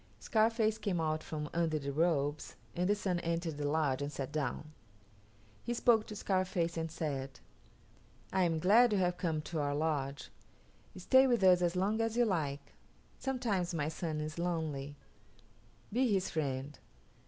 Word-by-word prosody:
Scarface 220 0 +2
came 200 -5 -1
out 155 -1 0
from 150 -1 -5
under 165 -2 +1
the 140 -1 -3
robes 145 -1 0 0.2
and 180 +2 0
the 205 - +4
Sun 185 -4 -1
entered 165 -2 -2
the 145 -1 0
lodge 145 -3 +1
and 145 +1 -3
sat 135 -1 -5
down. 150 0 -3 0.9
He 240 - -2
spoke 230 -2 +3
to 210 - -7
Scarface 185 -4 0
and 165 0 -2
said, 145 -5 -4 0.9
"I 190 - +2
am 165 -2 +1
glad 215 +8 +5
you - - +2
have 180 -1 +1
come 160 -4 -1
to 160 +1 -4
our 145 -1 0
lodge. 145 -3 -2 0.7
Stay 260 +9 +5
with 240 -5 +2
us 180 -1 +6
as 175 0 +1
long 205 +5 +1
as 225 0 -1
you 240 - +5
like. 145 -8 -2 0.5
Sometimes 215 -10 -1
my 150 -1 -1
son 160 -1 -3
is 155 +2 -5
lonely. 155 -5 -2 1.0
Be 250 0 +2
his 190 -2 +1
friend." 140 -2 -3
170 Hz, 165 wpm, -33 LUFS, 150-195 Hz, 1.0 s, us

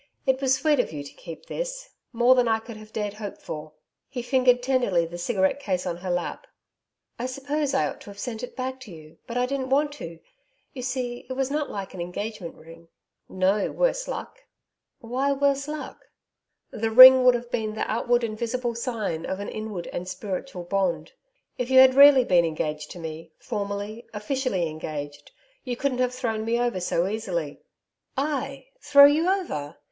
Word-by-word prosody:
It 265 -1 +1
was 265 -1 +3
sweet 295 +1 +2
of 245 - 0
you 145 -2 -6
to 140 - -11
keep 165 - -10
this - - -5 0.2
more 240 +1 +5
than 250 -2 +3
I 225 -1 +3
could 225 +1 -10
have 215 0 -13
dared 210 -2 -3
hope 210 -1 -7
for.' 155 0 -8 0.4
He 250 -3 -5
fingered 250 -1 +3
tenderly 245 -10 +2
the 170 +1 -8
cigarette 190 +5 +1
case 185 -9 -2
on 175 -2 -3
her 180 +1 -6
lap. 175 0 -3 0.7
'I 245 - -2
suppose 275 +2 -2
I 270 - +2
ought - - -8
to - - -11
have 200 - -11
sent 225 +1 -5
it 250 - -7
back 260 0 -4
to 250 -6 -11
you. 155 -2 -14
But 235 - -4
I 250 - +2
didn't 260 0 -3
want 290 +2 +2
to. 170 - -8 0.6
You 255 - -6
see 250 -1 -4
it - - -2
was 270 +1 -1
not 295 0 -1
like 195 -1 -6
an 185 - -6
engagement 185 +1 -5
ring.' 165 +1 -15 0.4
'No, 190 +2 +1
worse - - 0
luck.' - - -6 0.6
'Why, 260 +4 0
worse 280 0 +1
luck?' 300 0 -7 0.6
'The 225 +1 -2
ring 255 +3 +10
would 250 -1 +6
have 240 0 -5
been 215 -1 -2
the - - -4
outward 240 +2 +1
and 220 -2 -2
visible 235 +2 -2
sign 225 -9 -3
of 190 - -3
an 205 - -5
inward 215 -5 -5
and 180 - -4
spiritual 190 +1 -5
bond. 175 -3 -1 0.5
If 250 0 -2
you 260 - +4
had 260 0 +9
been 265 - 0
really 280 -3 +8 0.2
engaged 150 -1 -3
to - - -9
me 160 0 -8
formally, 205 +1 -5
officially 210 -5 -1
engaged, 145 -2 -7 0.3
you 250 -1 -3
couldn't 260 -2 -1
have 250 0 0
thrown 225 -4 -2
me 230 +2 0
over 240 -5 0
so 175 -1 0
easily.' 180 -8 -3 0.6
'I 275 -1 -2 0.2
throw 280 -1 +8
you 310 +5 +4
over! 340 - -2
235 Hz, 190 wpm, -25 LUFS, 185-265 Hz, 0.7 s, ring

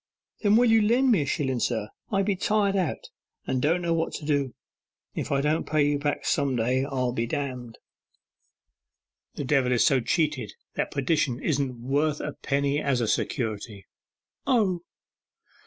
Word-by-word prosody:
'Then 205 -1 +4
will 240 +2 +5
you 225 -1 +5
lend 245 +5 +3
me 200 -9 +4
a - - -1
shillen, 130 -3 -1
sir? 110 -3 -1 0.2
I 195 -1 +2
be 200 0 0
tired 200 +1 +1
out, 180 -6 -2 0.3
and 130 - -1
don't 170 +5 +1
know 170 -1 +1
what 165 0 0
to 150 - -6
do. 145 -4 0 0.6
If 150 - -4
I 140 -1 +2
don't 150 +3 0
pay 150 -2 +3
you 145 -1 +1
back 145 0 -2
some 140 -3 +1
day 125 +3 +1
I'll 130 -3 -1
be 115 -1 -2
d - - -2
d.' 125 -4 -5 1.6
'The - - -3
devil 135 -2 +2
is 120 - +3
so 135 -4 +4
cheated 140 - -1 0.2
that - - -1
perdition 135 -3 0
isn't 135 -6 -1
worth 145 +2 +1
a 150 - -4
penny 140 +1 0
as 140 -4 +1
a 115 - 0
security.' 105 -3 -2 0.6
'Oh! 200 -9 +2
145 Hz, 170 wpm, -26 LUFS, 125-165 Hz, 1.6 s, will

